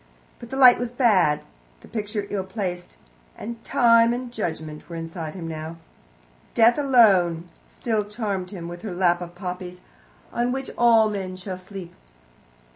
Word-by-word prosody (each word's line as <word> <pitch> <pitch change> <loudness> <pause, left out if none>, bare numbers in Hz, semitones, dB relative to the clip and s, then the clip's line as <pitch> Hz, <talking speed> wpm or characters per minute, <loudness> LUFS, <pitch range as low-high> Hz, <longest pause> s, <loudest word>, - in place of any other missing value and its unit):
But 235 - -10
the 265 - -4
light 255 -2 +8
was 245 -1 -2
bad, 210 - +3 0.4
the - - -15
picture 210 -1 -3
ill 195 -2 -1
placed, 185 -2 -5 0.4
and 230 0 -7
Time 230 0 +4
and 245 -1 -6
Judgment 160 -8 -5
were 170 - -6
inside 165 0 -6
him 170 -3 -6
now. 160 +1 -6 0.8
Death 235 +4 +5
alone 195 - +4 0.2
still 220 -3 -1
charmed 205 -4 -3
him, 180 -4 -7
with 175 0 -8
her 195 -4 -5
lap 175 -1 +2
of 175 0 -8
poppies, 180 -1 -6 0.5
on 240 +1 0
which 265 +1 -4
all 230 -2 +5
men 190 -3 -4
shall 185 0 -6
sleep. 185 -2 -9
195 Hz, 155 wpm, -24 LUFS, 175-230 Hz, 0.8 s, light